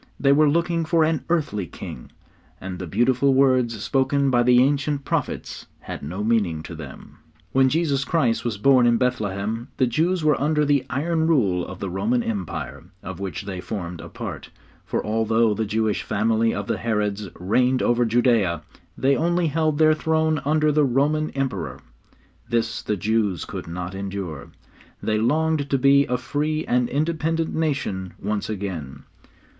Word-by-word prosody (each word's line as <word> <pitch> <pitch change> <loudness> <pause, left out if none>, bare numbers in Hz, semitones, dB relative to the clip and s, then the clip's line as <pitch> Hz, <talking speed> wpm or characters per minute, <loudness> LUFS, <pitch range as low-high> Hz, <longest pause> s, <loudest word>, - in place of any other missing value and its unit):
They 140 - +4
were 150 +1 +5
looking 170 +2 +1
for 160 0 +2
an 160 -1 0
earthly 140 - 0
king, 60 - -9 0.5
and 90 -1 -6
the 95 - -5
beautiful 125 - +2
words 130 -4 +3
spoken 135 0 +1
by 120 -1 +4
the 125 0 +5
ancient 140 0 0
prophets - - -3
had - - -7
no 90 +8 -4
meaning 100 -9 +1
to 85 - -8
them. 75 -5 -11 0.3
When 130 0 +4
Jesus 145 -3 +1
Christ 120 -8 +1
was 115 -4 -2
born 130 +2 +5
in 120 -1 +4
Bethlehem, 110 -2 -2
the 130 - +3
Jews 165 +8 0
were 150 -3 +2
under 150 +1 +2
the 140 -3 +2
iron 160 +6 0
rule 100 - +2
of 90 - -7
the 95 +1 -4
Roman 110 +6 0
Empire, 95 -6 -4 0.2
of 95 -2 -7
which 95 -1 -4
they 95 -2 -5
formed 90 -4 -5
a - - -9
part, - - -7 0.3
for - - -3
although 110 +1 +2
the 110 +1 -1
Jewish 110 0 0
family 110 +2 +1
of 100 - -3
the - - -2
Herods 105 -3 -1
reigned 125 +8 +2
over 120 0 +3
Judea, 115 - +2 0.3
they 135 +1 +3
only 170 +3 +1
held 155 0 0
their 155 0 +5
throne 160 0 +1
under 155 +1 +3
the 150 0 +3
Roman 145 +4 +1
Emperor. 125 -12 -3 0.7
This 115 -1 -1
the 105 - -2
Jews 105 -3 0
could - - -7
not 90 +2 -5
endure. 95 -7 -5 0.5
They 110 -1 +1
longed 150 +4 +1
to 135 - +2
be 140 +2 +4
a 125 - 0
free 155 +4 -2
and 125 0 +1
independent 160 +2 -1
nation 135 - -2
once 105 0 -2
again. 85 -10 -5
120 Hz, 165 wpm, -23 LUFS, 100-145 Hz, 0.7 s, were